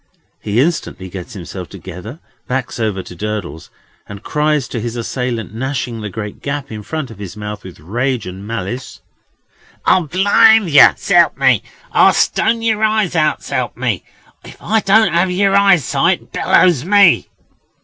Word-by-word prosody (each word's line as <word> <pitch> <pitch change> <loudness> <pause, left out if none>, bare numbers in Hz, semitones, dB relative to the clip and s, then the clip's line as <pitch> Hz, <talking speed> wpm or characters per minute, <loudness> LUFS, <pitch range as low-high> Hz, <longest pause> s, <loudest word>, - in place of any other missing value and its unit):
He 105 +2 -1
instantly 135 - -1
gets 90 -1 -8
himself 90 -1 -8
together, 95 - -9 0.3
backs 125 -1 -3
over 105 -4 -2
to 90 - -11
Durdles, 100 -5 -5 0.4
and 100 +1 -9
cries 150 -3 0
to 115 - -4
his 120 +1 -4
assailant, 120 -2 -4
gnashing 120 -1 -4
the 105 - -5
great 105 +1 -7
gap 140 -1 -4
in 110 -1 -6
front 155 +3 -5
of 105 - -13
his 100 0 -8
mouth 105 -1 -6
with 95 -4 -12
rage 120 - -2
and 95 +3 -8
malice: 115 +3 -5 0.8
"I'll 180 -4 +3
blind 200 +3 +4
yer, 145 - +7
s'elp 175 -5 +3
me! 130 -5 +3 0.3
I'll - - +5
stone 225 +1 +1
yer 220 -2 0
eyes 215 -4 +1
out, 155 -2 +1
s'elp - - -3
me! - - -2 0.4
If - - -13
I 220 - +1
don't 210 -2 +3
have 175 +2 +2
yer 195 +2 +1
eyesight, 195 -8 +2
bellows 170 -8 +3
me!" 200 -1 +4
130 Hz, 160 wpm, -16 LUFS, -, 0.8 s, yer